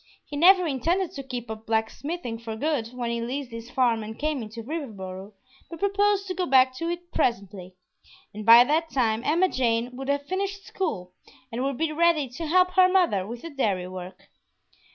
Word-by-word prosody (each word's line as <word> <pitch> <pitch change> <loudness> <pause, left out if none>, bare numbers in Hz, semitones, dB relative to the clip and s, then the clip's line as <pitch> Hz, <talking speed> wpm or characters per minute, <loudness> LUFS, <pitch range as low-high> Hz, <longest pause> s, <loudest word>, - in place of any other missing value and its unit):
He 290 - -8
never 365 +4 +6
intended 335 +6 0
to 275 - -6
keep 245 -3 -6
up 220 0 -9
"blacksmithing" 230 +4 -2
for 225 -1 -6
good 280 -2 -1
when 240 0 -4
he 235 0 -2
leased 255 +2 -4
his 230 +1 -8
farm 245 -3 +1
and 220 +1 -7
came 300 -3 -1
into 225 +1 -8
Riverboro, 210 - -6 0.4
but 335 - -8
proposed 400 +1 +1
to 375 - -3
go 365 0 -2
back 260 -1 +5
to 335 +3 -2
it 345 0 -6
presently, 195 -5 -2 0.6
and 215 +1 -7
by 230 +2 +9
that 315 +5 0
time 230 -5 +1
Emma 340 +7 +3
Jane 245 -4 0
would 270 +1 -6
have 285 0 0
finished 390 +3 -3
school 180 - -4 0.4
and 240 +3 -3
would 275 -2 -2
be 320 0 0
ready 320 -2 +2
to 315 +7 -6
help 365 +3 +4
her 370 0 +5
mother 335 - +2
with 235 +2 -8
the 335 - -7
dairy 200 -10 -1
work. 185 0 -9
260 Hz, 195 wpm, -25 LUFS, 225-335 Hz, 0.6 s, by